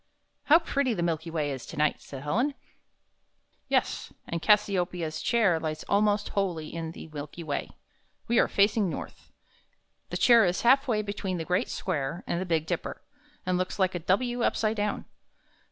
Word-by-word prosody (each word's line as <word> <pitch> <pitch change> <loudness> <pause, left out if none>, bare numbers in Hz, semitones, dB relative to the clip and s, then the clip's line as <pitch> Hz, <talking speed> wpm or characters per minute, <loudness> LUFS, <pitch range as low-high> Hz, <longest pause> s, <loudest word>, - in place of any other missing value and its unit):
"How 305 - +8
pretty 280 -7 0
the 175 - -1
Milky 165 -1 -1
Way 155 -3 -1
is 130 -3 -5
tonight!" 150 0 0
said 135 -1 -9
Helen. 245 - 0 1.1
"Yes, - - 0
and 170 -1 -4
Cass 210 +2 +5
i 200 - -2
o 180 - +3
pe' 175 +1 -9
ia's 160 -2 -3
Chair 210 -8 +3
lies 155 -1 -4
almost 205 0 +2
wholly 175 -6 -2
in 165 -1 -4
the - - -9
Milky 150 +3 -7
Way. 145 -3 -3 0.6
We 235 0 +3
are - - +4
facing 205 -1 +2
north. - - -8 0.8
The - - -2
chair 235 -2 +6
is 180 -1 +1
half 270 +4 +5
way 215 -3 +1
between 200 -2 -3
the 165 - -4
Great 180 +2 0
Square 160 -1 -3
and 170 - -1
the 185 - -4
Big 160 -2 +1
Dipper, - - -4 0.4
and 180 0 +1
looks 185 - -2
like 190 -2 +2
a 175 - -2
W 240 +8 0
upside 220 -1 +1
down. 205 0 -1
185 Hz, 185 wpm, -28 LUFS, 160-215 Hz, 1.1 s, How